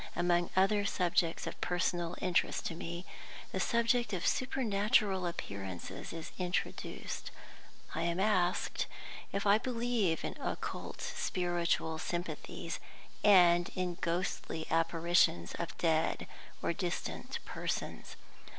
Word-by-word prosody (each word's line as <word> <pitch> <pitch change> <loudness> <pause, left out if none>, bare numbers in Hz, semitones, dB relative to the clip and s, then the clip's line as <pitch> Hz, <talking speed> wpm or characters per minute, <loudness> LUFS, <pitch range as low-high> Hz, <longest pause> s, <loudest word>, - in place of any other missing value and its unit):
Among 175 0 +2
other 200 +2 +4
subjects 175 -4 +1
of - - -6
personal 175 -1 0
interest 180 -2 +1
to - - -1
me, 170 +2 -5 0.5
the - - -2
subject 235 -1 +2
of 180 -2 -1
supernatural 210 -6 +2
appearances 95 - -5
is 165 -1 -6
introduced. 180 -1 -3 0.6
I 160 - -1
am 170 +1 0
asked 185 -3 +2 0.4
if 200 +1 -1
I 205 +1 +6
believe 230 -8 0
in - - -3
occult - - -4
spiritual 175 -3 0
sympathies, 175 +1 -4 0.4
and 175 -4 +7
in 180 -1 0
ghostly 165 -2 -1
apparitions 165 - +3
of 170 - -4
dead 160 -1 +2 0.4
or - - +1
distant - - -3
persons. - - -4
175 Hz, 110 wpm, -33 LUFS, 170-200 Hz, 0.6 s, and